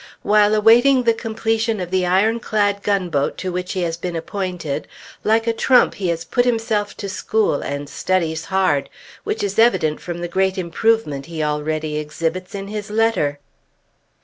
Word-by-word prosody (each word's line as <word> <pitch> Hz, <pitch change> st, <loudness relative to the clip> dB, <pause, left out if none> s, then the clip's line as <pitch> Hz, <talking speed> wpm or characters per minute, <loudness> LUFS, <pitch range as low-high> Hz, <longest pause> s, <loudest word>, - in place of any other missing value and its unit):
While 210 Hz, 0 st, +4 dB
awaiting 240 Hz, +5 st, +5 dB
the 230 Hz, -1 st, +4 dB
completion 225 Hz, 0 st, -1 dB
of 180 Hz, -1 st, -5 dB
the 185 Hz, -1 st, +1 dB
ironclad 205 Hz, +1 st, +1 dB
gunboat 180 Hz, -9 st, 0 dB
to 185 Hz, -, -3 dB
which 180 Hz, 0 st, -3 dB
he 185 Hz, -2 st, -1 dB
has 165 Hz, -1 st, -2 dB
been 175 Hz, 0 st, -4 dB
appointed, 180 Hz, -4 st, -4 dB, 0.4 s
like 225 Hz, +1 st, +2 dB
a 230 Hz, -, +1 dB
trump 250 Hz, +2 st, +4 dB
he 190 Hz, -, -3 dB
has 165 Hz, -1 st, -2 dB
put 245 Hz, -, +1 dB
himself 225 Hz, -4 st, -1 dB
to 200 Hz, -, -5 dB
school, 205 Hz, -4 st, 0 dB
and 140 Hz, 0 st, -4 dB
studies 165 Hz, -1 st, -1 dB
hard, 190 Hz, -7 st, +1 dB, 0.3 s
which 425 Hz, -, -2 dB
is 200 Hz, +1 st, -1 dB
evident 160 Hz, -10 st, +3 dB
from 175 Hz, -1 st, -5 dB
the 175 Hz, -, -2 dB
great 190 Hz, +2 st, 0 dB
improvement 175 Hz, -5 st, 0 dB
he 165 Hz, -2 st, -3 dB
already 150 Hz, +1 st, -2 dB
exhibits 165 Hz, +5 st, -4 dB
in 195 Hz, 0 st, -5 dB
his 210 Hz, 0 st, -5 dB
letter.... 215 Hz, -10 st, +1 dB
190 Hz, 165 wpm, -20 LUFS, 165-220 Hz, 0.4 s, awaiting